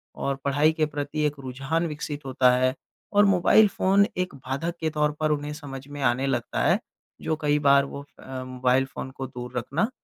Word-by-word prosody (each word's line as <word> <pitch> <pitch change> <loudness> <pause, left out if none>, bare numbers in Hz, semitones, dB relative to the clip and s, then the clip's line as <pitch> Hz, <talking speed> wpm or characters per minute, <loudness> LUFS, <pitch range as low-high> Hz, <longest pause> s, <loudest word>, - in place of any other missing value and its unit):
और 140 - -2
पढ़ाई 145 +3 +3
के 155 -1 +1
प्रति 150 0 -3
एक 150 - -4
रुझान 135 +6 -2
विकसित 150 -2 -6
होता 130 -1 +4
है 130 0 +2 0.4
और 205 0 +6
मोबाइल 195 +3 +5
फ़ोन 195 +1 +3
एक 180 -3 -2
बाधक 140 +5 -3
के 160 - 0
तौर 150 -1 +1
पर 155 -1 +1
उन्हें 150 0 -2
समझ 140 -3 -8
में 145 0 -7
आने 125 +2 +2
लगता 120 -3 -1
है - - +3 0.4
जो 160 - -1
कई 150 0 +2
बार 140 -1 +5
वो 140 0 -7
फ़ 145 - -22
अ, 130 -1 -6
मोबाइल 130 +1 +1
फ़ोन 135 0 -7
को 135 0 -6
दूर 125 0 -7
रखना 140 - 0
145 Hz, 205 wpm, -25 LUFS, 130-155 Hz, 0.4 s, और